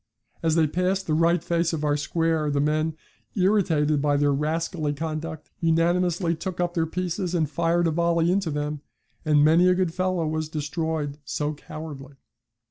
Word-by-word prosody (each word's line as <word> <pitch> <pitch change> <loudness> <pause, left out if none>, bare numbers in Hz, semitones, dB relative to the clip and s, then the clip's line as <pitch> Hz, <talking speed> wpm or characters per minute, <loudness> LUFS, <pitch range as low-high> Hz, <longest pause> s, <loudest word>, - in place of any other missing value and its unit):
As 160 -1 +1
they 165 -1 +4
passed 180 +5 0
the 155 - -1
right 165 +1 +2
face 170 -1 0
of 155 -2 -2
our 145 -1 +2
square 160 0 0
the 145 -1 0
men, 155 +2 0 0.4
irritated 170 -7 +2
by 145 -1 +2
their 145 0 +2
rascally 155 +1 -1
conduct, 155 +1 -5
unanimously 170 +1 +2
took 180 +2 -5
up 175 -1 0
their 165 -2 0
pieces 180 +1 -2
and 160 -3 +1
fired 170 +4 +1
a 165 - +2
volley 170 +1 +2
into 190 -2 0
them, 150 0 -3 0.4
and 150 -1 +4
'many 165 +4 +5
a 180 - +4
good 180 -3 0
fellow 185 -2 0
was 155 0 -2
destroyed 155 -1 -3
so 150 +1 -2
cowardly.' 145 -2 -9
160 Hz, 170 wpm, -25 LUFS, 150-175 Hz, 0.4 s, many